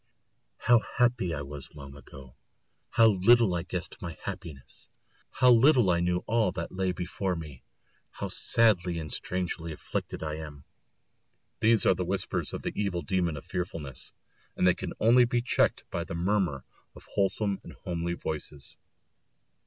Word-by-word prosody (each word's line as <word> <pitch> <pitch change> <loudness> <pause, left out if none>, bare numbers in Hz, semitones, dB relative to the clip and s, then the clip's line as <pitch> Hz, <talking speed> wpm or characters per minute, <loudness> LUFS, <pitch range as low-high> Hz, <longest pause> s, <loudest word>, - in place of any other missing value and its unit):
"How 120 -1 +5
happy 120 -6 0
I 75 -3 -3
was 70 0 -7
long 70 -1 -10
ago; 65 -2 -13 0.5
how 115 - +5
little 110 0 +5
I 85 - 0
guessed 90 +1 -5
my 85 -2 -6
happiness; 85 -8 -8 0.4
how 125 0 +4
little 120 -4 +5
I 85 - +2
knew 90 +1 0
all 110 -4 +2
that 85 - -5
lay 95 -1 -1
before 90 +1 -3
me; 75 -6 -8 0.5
how - - -5
sadly 95 -7 +2
and 80 -2 -3
strangely 85 -2 -3
afflicted 75 - -5
I 75 0 -3
am!" 75 -3 -9 0.9
These 115 0 +4
are - - +6
the - - -3
whispers - - -2
of - - -6
the - - -3
evil 95 -4 -1
demon 90 -6 0
of 70 - -9
fearfulness; 85 -7 -5 0.4
and - - +1
they 90 - +6
can - - -6
only 120 +3 +6
be 120 0 0
checked 120 - +1
by - - -2
the - - -6
murmur 85 -6 0 0.3
of - - -14
wholesome 100 0 +1
and - - -11
homely 85 -1 -3
voices. 75 -3 -6
90 Hz, 160 wpm, -28 LUFS, 80-105 Hz, 0.9 s, are